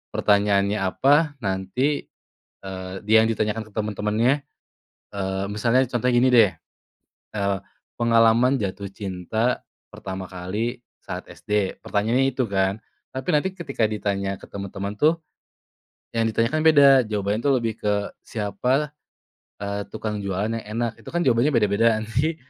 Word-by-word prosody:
pertanyaannya 100 0 +2
apa 145 - +3
nanti 95 +10 -1 0.5
eee, 95 -1 -6
dia 110 +1 +6
yang 115 - 0
ditanyakan 110 0 -1
ke - - -18
teman-temannya 110 +6 0 0.7
eee, 95 0 -2
misalnya 115 +5 +2
contohnya 125 +1 +1
gini 125 +2 +5
deh, 115 -5 +6 0.8
eee, 100 -1 0 0.4
"Pengalaman 115 +2 +4
jatuh 100 +1 -3
cinta 100 +5 -2 0.3
pertama 95 -1 -6
kali 105 +7 -3 0.2
saat - - -6
SD?" 105 -2 -2
pertanyaannya 115 +6 +1
itu 130 -2 0
kan. 95 +1 +1 0.4
Tapi 130 0 -5
nanti 185 +6 +1
ketika 140 -10 -1
ditanya 100 -2 -2
ke - - -12
teman-teman 100 +1 -5
tuh, 160 +2 +3 0.9
yang 115 0 +2
ditanyakan 115 +8 +1
beda. 145 -3 +8 0.2
Jawabannya 105 0 -1
tuh 140 - +3
lebih 115 -2 -2
ke, 105 -1 0
"Siapa, 125 +8 -1 0.7
eee, 100 0 -3
tukang 105 -1 -3
jualan 100 +3 -1
yang 115 - -6
enak?" 115 -1 -1
Itu - - -10
kan 175 - 0
jawabannya 125 +3 +3
beda-beda 110 +1 +3
nanti, 135 +9 -1
110 Hz, 135 wpm, -24 LUFS, 100-125 Hz, 0.9 s, beda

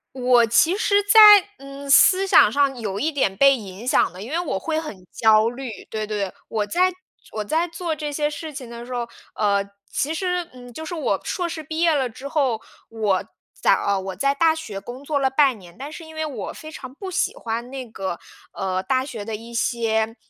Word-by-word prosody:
我 250 -2 +4
其 315 - +3
实 410 -2 +2
在， 410 +2 +6 0.4
嗯， 275 +1 -10
思 375 +7 +6
想 380 - +6
上 270 +1 +1
有 200 -4 -4
一 310 +9 0
点 265 -10 0
被 275 +4 +5
影 200 0 -9
响 250 - +2
的， 185 - -10
因 235 - -8
为 330 - 0
我 340 - -2
会 315 +10 -2
很 210 - -9
焦 220 0 +4
虑。 255 +1 -7 0.2
对 215 -1 -4
对， 205 -3 -2 0.2
我 215 -2 -1
在 360 - +2 0.4
我 215 - -3
在 320 +10 0
做 335 0 -4
这 300 -1 -4
些 295 0 0
事 305 +1 -7
情 255 -3 -8
的 235 0 -8
时 250 - -7
候， 240 -1 -3 0.2
呃， 200 -2 +1 0.3
其 300 +3 -1
实， 360 0 -2
嗯， 245 -1 -12
就 315 +7 -8
是 345 - -5
我 315 - -1
硕 350 -2 -2
士 325 - -5
毕 315 +2 -5
业 335 -1 +4
了 265 -4 0
之 265 +5 -9
后， 270 -7 0 0.3
我 210 -4 -1 0.3
在 - - +3
呃， 200 -1 0
我 190 0 -6
在 275 +8 +1
大 320 +3 +3
学 220 -12 -6
工 245 +6 -9
作 285 0 -1
了 265 -1 +2
半 265 -4 +3
年， 175 -2 -15
但 280 +3 -7
是 325 +1 -9
因 320 0 -13
为 315 0 -2
我 255 -10 -6
非 310 - -10
常 260 -4 -9
不 380 +4 -7
喜 365 - 0
欢 235 +2 -4
那 265 -1 -6
个， 190 -6 -5 0.4
呃， 185 -1 -2
大 260 +2 +1
学 235 -7 -7
的 220 0 -4
一 230 +2 -10
些 225 -1 0
260 Hz, 235 characters per minute, -22 LUFS, 220-315 Hz, 0.4 s, 在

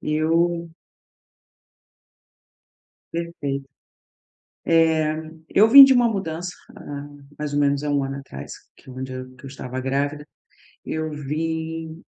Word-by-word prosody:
Eu 165 +2 +1 2.4
Perfeito. 145 -5 -4 1.0
Eh, 160 -2 +3 0.3
eu 215 +3 +5
vim 275 +4 +12
de 270 - +5
uma 240 -1 +4
mudança 180 -4 -3 0.2
há 145 0 -7 0.3
mais 150 -1 -4
ou 145 - +2
menos 140 0 +2
há 150 - -2
1 140 -1 +1
ano 135 0 -4
atrás, 70 - -9 0.2
que 130 - -15
onde 130 0 -6
eu 130 0 -8
que 130 - -18
eu - - -6
estava 130 -1 -6
grávida. 140 +3 -2 0.6
Eu 160 0 -3
vim, 160 +2 -4
150 Hz, 125 wpm, -23 LUFS, 140-165 Hz, 2.4 s, vim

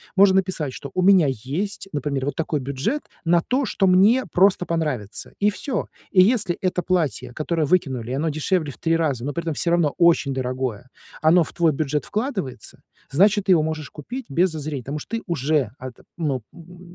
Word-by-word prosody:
Можно 190 -1 +6
написать, 180 -8 -1
что 140 - -8
у 185 - 0
меня 185 -3 +6
есть, 145 - -4
например, 140 -2 -2
вот 145 -1 -2
такой 160 -2 -1
бюджет 140 - -2 0.2
на 170 0 +4
то, 260 +8 0
что 195 -5 +1
мне 205 +8 +5
просто 185 0 +3
понравится, 150 -11 -3
и 205 - +4
всё. 235 +3 -3 0.2
И 185 - +6
если 200 -3 +2
это 180 -1 0
платье, 165 -8 -1
которое 155 +3 -1
выкинули, 130 -8 0
и - - -2
оно 150 +4 0
дешевле 155 +1 -1
в - - -14
3 165 0 +1
раза, 145 -7 -1
но 145 - -3
при 170 - -3
этом 165 -2 -2
всё 170 - 0
равно 170 -4 +2
очень 170 -5 +3
дорогое, 130 -3 -3 0.3
оно 165 +2 +5
в - - -8
твой 170 -2 +3
бюджет 150 0 -1
вкладывается, 210 - -4 0.3
значит, 200 +7 +3
ты 195 - +3
его 160 -3 +3
можешь 155 -1 -4
купить 245 - -7
без 175 +7 +2
зазрения. 150 -4 -5
Потому 140 +5 -4
что 230 +9 -4
ты - - -8
уже 150 - 0
ат 130 -1 -7 0.2
ну, 145 -7 -1
м, 175 +1 -14
165 Hz, 200 wpm, -22 LUFS, 140-185 Hz, 0.3 s, Можно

